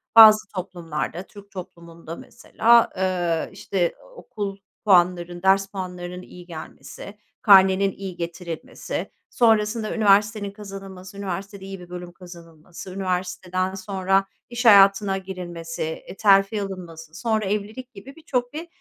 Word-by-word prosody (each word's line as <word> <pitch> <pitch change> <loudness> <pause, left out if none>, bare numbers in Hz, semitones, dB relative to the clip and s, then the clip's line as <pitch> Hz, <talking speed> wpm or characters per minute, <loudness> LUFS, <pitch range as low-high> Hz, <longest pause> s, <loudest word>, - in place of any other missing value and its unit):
Bazı 215 -2 +9
toplumlarda, 170 -2 -4
Türk 200 +1 -15
toplumunda 170 -3 -9
mesela, 235 +6 +2
ııı, 175 -3 0
işte, 175 -3 -1 0.2
okul 205 - -6 0.3
puanlarının, 175 -2 +3
ders 195 +1 +4
puanlarının 180 -2 -6
iyi 180 -1 -13
gelmesi, 175 +4 -10 0.2
karnenin 195 -1 +6
iyi 190 -1 -7
getirilmesi, 170 -1 -6 0.2
sonrasında 220 -1 +2
üniversitenin 210 -1 +3
kazanılması, 195 -2 -10
üniversitede 195 0 -5
iyi 195 -1 -7
bir 175 -1 -13
bölüm 180 0 -7
kazanılması, 170 0 -12
üniversiteden 185 0 -2
sonra 195 0 0 0.2
iş 245 +1 -4
hayatına 195 -2 +6
girilmesi, 175 -3 -7
e, 160 +4 -6
terfi 195 0 +4
alınması, 170 -5 -8
sonra 220 +1 -1
evlilik 215 +5 -4
gibi 240 +8 -12
birçok 250 -6 -3
bir, 325 +3 -6
190 Hz, 120 wpm, -23 LUFS, 175-205 Hz, 0.3 s, Bazı